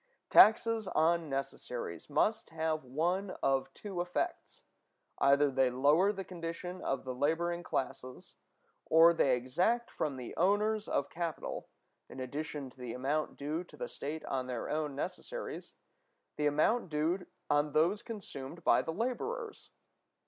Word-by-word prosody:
Taxes 225 -1 +6
on 165 0 +2
necessaries 125 - -4
must 220 +9 +1
thus 160 - -17
have 160 -1 0
one 175 +9 -1
of 135 0 +1
two 195 -4 -4
effects: 180 0 -3 0.6
either 140 +1 +5
they 130 -1 +3
lower 145 +10 +4
the 195 -2 -5
condition 180 +1 -6
of 135 - -1
the 130 - -4
laboring 165 +6 0
classes, 130 -5 -4 0.5
or 165 +1 +7
they 135 -6 +3
exact 180 - 0
from 145 -3 -2
the 125 -2 -7
owners 210 +4 +2
of 140 - -1
capital, 170 -2 -4 0.4
in - - -9
addition 145 +2 -4
to 130 - -22
the 125 -2 -5
amount 145 +4 -1
due 150 +4 -2
to - - -16
the - - -4
state 155 - -5
on 130 -1 -2
their 125 -2 -4
own 150 -2 -1
necessaries, 190 - -5 0.6
the 150 - +1
amount 170 +9 +2
due 160 +5 0 0.2
on 145 0 +2
those 175 +7 +3
consumed 170 - -8
by - - +5
the 160 - -4
laborers. 420 - -3
160 Hz, 145 wpm, -33 LUFS, 135-185 Hz, 0.6 s, or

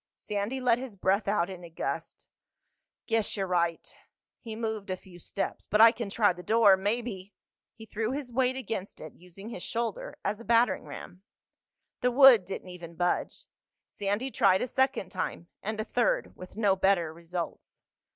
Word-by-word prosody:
Sandy 210 +5 -3
let 245 -2 +3
his 255 -5 -7
breath 195 +3 +1
out 195 -4 +2
in 185 -2 -9
a 170 - -9
gust. 165 - -5 0.8
"Guess 225 -2 0
you're 195 - 0
right." 170 -2 0 0.5
He 225 -2 -7
moved 220 -3 -4
a 185 - -2
few 180 -1 -15
steps. 195 - -4
"But 210 - +1
I 225 +1 +9
can 230 -3 -5
try 205 -1 +3
the 180 - -10
door. 215 +1 +5
Maybe—" 205 -1 -3 0.4
He 220 - -11
threw 220 +1 -2
his 265 -2 -4
weight 255 +1 +2
against 220 -6 -5
it, 155 - -9
using 180 +4 -11
his 220 - -7
shoulder 230 0 -3
as 205 +1 -1
a - - -9
battering 235 +2 +2
ram. 180 - -9 0.8
The 250 - +3
wood 250 -6 +8
didn't 190 0 -6
even 170 -2 -10
budge. 175 +1 -1 0.4
Sandy 205 +6 -2
tried 190 -4 +3
a - - -2
second 265 -7 0
time, 170 - -4
and 215 +1 -4
a - - 0
third, - - 0
with 185 +2 -12
no 205 -3 +3
better 185 -4 +2
results. 170 +1 -7
205 Hz, 175 wpm, -29 LUFS, 185-230 Hz, 0.8 s, I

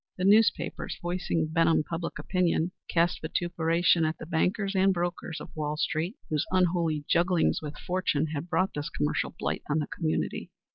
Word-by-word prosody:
The 180 - -2
newspapers, 215 +3 +3
voicing 175 -2 -1
Benham 165 -2 +4
public 165 +1 -4
opinion, 180 -2 0 0.2
cast 170 +1 +2
vituperation 170 +1 +1
at 155 +1 0
the - - -8
bankers 185 +5 0
and 195 0 +4
brokers 175 -2 -3
of 160 - -11
Wall 150 -1 -2
street, 165 +6 -1 0.2
whose 155 0 0
unholy 170 -5 +1
jugglings 175 0 +2
with 150 -1 -7
fortune 180 -5 0
had 155 +4 -4
brought 185 +3 +1
this 150 +2 -4
commercial 150 +1 -1
blight - - -2
on 150 - +2
the 150 - 0
community. 160 +1 -2
170 Hz, 160 wpm, -28 LUFS, 160-180 Hz, 0.2 s, Benham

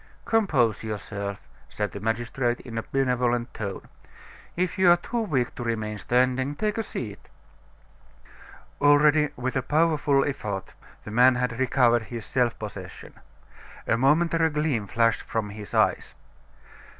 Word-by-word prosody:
"Compose 140 - +2
yourself," 100 -2 -5 0.3
said 105 -1 -3
the - - -7
magistrate 120 +3 -1
in 120 -3 -9
a 115 - -1
benevolent 125 -2 0
tone; 100 -3 -5 0.7
"if 185 +2 -1
you 185 -2 +6
are 175 - +7
too 235 +6 -3
weak 135 - -1
to - - -6
remain 110 -2 -3
standing, 130 +5 +1
take 210 +6 -1
a - - +2
seat." 110 - -6 1.6
Already, 145 +1 +5
with 125 +1 -3
a 130 - +1
powerful 150 -1 +2
effort, 105 -9 -4 0.3
the 105 - -8
man 125 +3 +5
had 125 -1 -2
recovered 125 -3 +3
his 115 -2 -7
self 125 -3 0
possession. 105 -2 -9 0.7
A - - +2
momentary 160 +6 +3
gleam 150 -8 -1
flashed 115 +2 +2
from 110 -2 -3
his 105 0 -9
eyes. - - +1
125 Hz, 140 wpm, -25 LUFS, 110-145 Hz, 1.6 s, are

